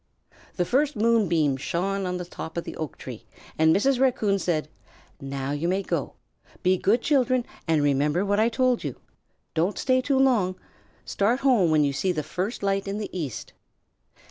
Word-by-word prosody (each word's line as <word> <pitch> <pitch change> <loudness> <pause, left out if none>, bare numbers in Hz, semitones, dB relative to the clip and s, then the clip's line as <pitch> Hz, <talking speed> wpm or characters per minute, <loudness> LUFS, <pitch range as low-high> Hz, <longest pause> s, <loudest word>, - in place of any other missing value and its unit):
The 180 - 0
first 285 - +1
moonbeam 195 -11 +2
shone 190 +7 -2
on 180 0 -2
the 180 - -5
top 165 -1 -8
of 170 - -1
the - - -7
oak 155 -2 -5
tree, 125 -4 -9 0.3
and 160 0 +5
Mrs. 255 +8 +2
Raccoon 220 -7 +2
said: 165 -5 -1 0.5
"Now 135 0 -4
you 145 +4 -1
may 190 +2 0
go. - - -3 0.5
Be 185 +1 +4
good 225 +5 +2
children 255 -4 +2 0.2
and 160 -2 +2
remember 145 +6 +1
what 205 +1 +1
I 225 +2 +4
told 255 0 +1
you. - - -4 0.6
Don't 170 +5 0
stay 255 -1 +2
too 275 +1 +1
long. 235 -9 +3 0.5
Start 230 +6 0
home 245 -11 +4
when 155 -1 +4
you 140 -1 +1
see 185 +7 0
the 155 -4 -2
first 195 - -4
light 195 0 0
in 200 +1 -3
the 210 -3 -6
east." 150 - -5
195 Hz, 180 wpm, -25 LUFS, 160-235 Hz, 0.6 s, and